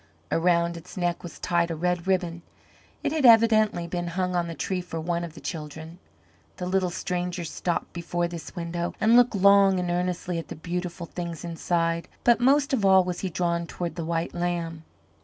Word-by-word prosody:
Around 170 0 +2
its 165 - -12
neck 175 -1 -1
was 175 - -9
tied 170 -1 +1
a 165 - -2
red 180 +2 -1
ribbon. 175 -3 0 0.6
It - - 0
had 310 -2 0
evidently 220 -6 +5
been 175 0 -3
hung 180 +1 -1
on 175 -1 0
the 165 - -6
tree 185 +2 -2
for 170 -2 -6
one 170 +1 -1
of 165 -2 -7
the - - -9
children. 160 +1 -7 0.6
The 180 - -4
little 185 0 +1
stranger 180 0 -3
stopped 170 +2 -3
before 175 0 -2
this 170 -1 -8
window 170 0 -3
and 220 +2 +4
looked 245 -2 +5
long 200 -1 +5
and 180 -1 -1
earnestly 180 -1 -1
at 165 - -7
the - - -7
beautiful 175 +1 -4
things 170 -1 -6
inside, 165 0 -1 0.2
but 240 -1 +5
most 275 +3 +3
of 235 -6 +1
all 190 -1 +6
was 180 -1 -3
he 190 - -2
drawn 170 0 -1
toward 175 -1 -4
the 170 - -5
white 165 +1 -2
lamb. 170 -2 -3
175 Hz, 195 wpm, -26 LUFS, 170-185 Hz, 0.6 s, all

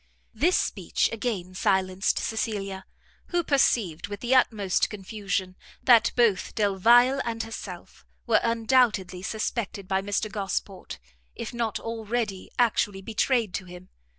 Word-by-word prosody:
This 330 +11 +2
speech - - 0
again 210 -6 -3
silenced 190 0 +1
Cecilia, 195 -4 -3 0.4
who 350 -1 0
perceived, 210 - +1
with 205 0 -7
the 245 +1 0
utmost 210 -7 +2
confusion, 195 -2 -4 0.3
that 230 -2 +6
both 230 -6 +2
Delvile 235 +6 +4
and 225 -1 -3
herself 225 0 -9 0.2
were 230 -2 +4
undoubtedly 230 -5 +2
suspected 210 -1 -3
by 190 0 +1
Mr 205 +2 -2
Gosport, 195 -2 -4 0.4
if - - -6
not 230 -3 -2
already 225 -3 -3
actually 205 -5 +1
betrayed 225 -1 0
to 195 - -4
him. 180 +1 -12
215 Hz, 125 wpm, -26 LUFS, 195-235 Hz, 0.4 s, that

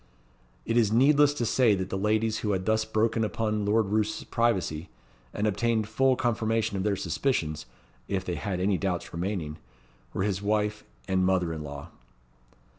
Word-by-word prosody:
It 115 - 0
is 110 -3 +3
needless 145 +5 +5
to 120 - -1
say 115 -2 +3
that 95 0 -4
the - - -1
ladies 110 +1 +1
who 105 -2 -1
had 95 -1 -2
thus 110 +1 +2
broken 110 +1 +1
upon 105 -1 -1
Lord 105 0 +2
Roos's 105 0 0
privacy, 95 -9 0 0.4
and 105 - -2
obtained 110 +1 +1
full 130 +4 +2
confirmation 115 -4 0
of 95 - -1
their 100 0 +1
suspicions 80 - -1 0.4
(if 95 -2 -2
they 90 - -2
had 90 +4 -3
any 95 0 +1
doubts 90 -3 -2
remaining) 85 -3 -3 0.5
were 95 - -2
his 100 -1 -1
wife 105 0 0 0.2
and 95 0 +1
mother 90 -3 +1
in 80 - -5
law. 70 +2 -8
105 Hz, 170 wpm, -27 LUFS, 95-110 Hz, 0.5 s, needless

